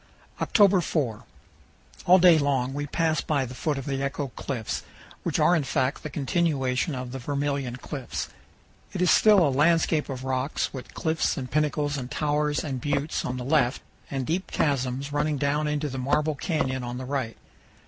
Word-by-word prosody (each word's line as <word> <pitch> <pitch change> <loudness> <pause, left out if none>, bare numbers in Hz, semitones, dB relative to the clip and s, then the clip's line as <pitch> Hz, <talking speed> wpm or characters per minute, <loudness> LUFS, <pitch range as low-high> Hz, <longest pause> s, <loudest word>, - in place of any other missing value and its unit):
October 200 -4 +5
4 130 -10 -2 0.8
All 180 +1 +8
day 175 -3 +7
long 135 -3 0
we 145 +1 -3
pass 160 +2 +1
by 140 -4 0
the 125 - -8
foot 145 +3 -1
of 135 - -5
the 135 -1 -2
Echo 140 0 -2
Cliffs, 125 -3 -4 0.4
which - - -1
are 180 - +5
in 160 - +1
fact 135 0 0
the 155 - -5
continuation 140 -1 0
of 125 -1 -5
the 135 - -5
Vermilion 140 -1 -2
Cliffs. 135 0 -5 0.7
It - - -3
is 180 - +4
still 205 -7 +6
a 140 - 0
landscape 160 +1 +2
of 130 -1 -5
rocks, 130 +2 -1
with 130 -2 -9
cliffs 160 -1 0
and 130 -3 -5
pinnacles 150 -1 0
and 125 -2 -5
towers 150 0 0
and 135 -5 -4
buttes 145 +2 -1
on 125 - -3
the 125 - -5
left, 135 -3 +2 0.3
and 135 -2 -2
deep 175 +6 -2
chasms 135 -1 -1
running 150 0 0
down 150 +2 0
into 150 0 -1
the 130 -2 -5
Marble 150 +4 +1
Canyon 135 -4 -1
on 120 0 -4
the 130 - -5
right. 130 -4 -3
140 Hz, 180 wpm, -26 LUFS, 130-155 Hz, 0.8 s, All